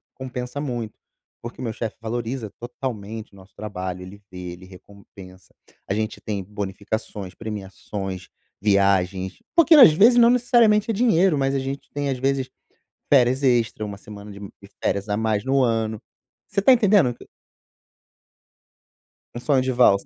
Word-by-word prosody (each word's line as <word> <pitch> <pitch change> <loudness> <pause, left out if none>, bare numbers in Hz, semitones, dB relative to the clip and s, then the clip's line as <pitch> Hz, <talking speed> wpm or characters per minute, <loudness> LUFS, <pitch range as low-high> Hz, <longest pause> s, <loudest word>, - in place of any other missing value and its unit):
compensa 130 +1 -6
muito, 120 -6 -5 0.4
porque, 120 +2 -8
o - - -4
meu 115 - -2
chefe 110 0 -5
valoriza 115 0 -4
totalmente 115 -4 -6
o - - -17
nosso 95 +1 -18
trabalho, 95 -3 -5
ele 100 +3 -11
vê, 90 -1 -7
ele 90 +1 -12
recompensa, 95 0 -15 0.3
a 95 - 0
gente 110 +1 -3
tem 100 -3 -4
bonificações, 100 0 -5
premiações, 95 -3 -6 0.3
viagens." 95 -2 +1 0.2
Porque, 335 -1 +6
às 255 - +9
vezes, 225 +9 +5
não 235 0 +7
necessariamente 235 -3 +3
é - - 0
dinheiro, 190 - +3
mas 135 0 0
a - - +1
gente 135 +1 -5
tem 145 -1 -2
às 130 - -2
vezes, 135 0 -1 0.6
férias 130 +1 +4
extra, 120 -4 +1
uma 100 -1 -7
semana 105 0 -11
de 100 - -11 0.4
férias 100 +2 -1
a 105 - +1
mais 110 0 0
no 135 0 +2
ano. 110 -2 -1 0.5
Você - - -1
está 255 +7 +6
entendendo 205 - +4
o - - -4
q - - -16 2.1
Um 120 - -5
sonho 135 0 +2
de 130 0 -1
valsa. 120 -6 +4
115 Hz, 160 wpm, -23 LUFS, 100-135 Hz, 2.1 s, às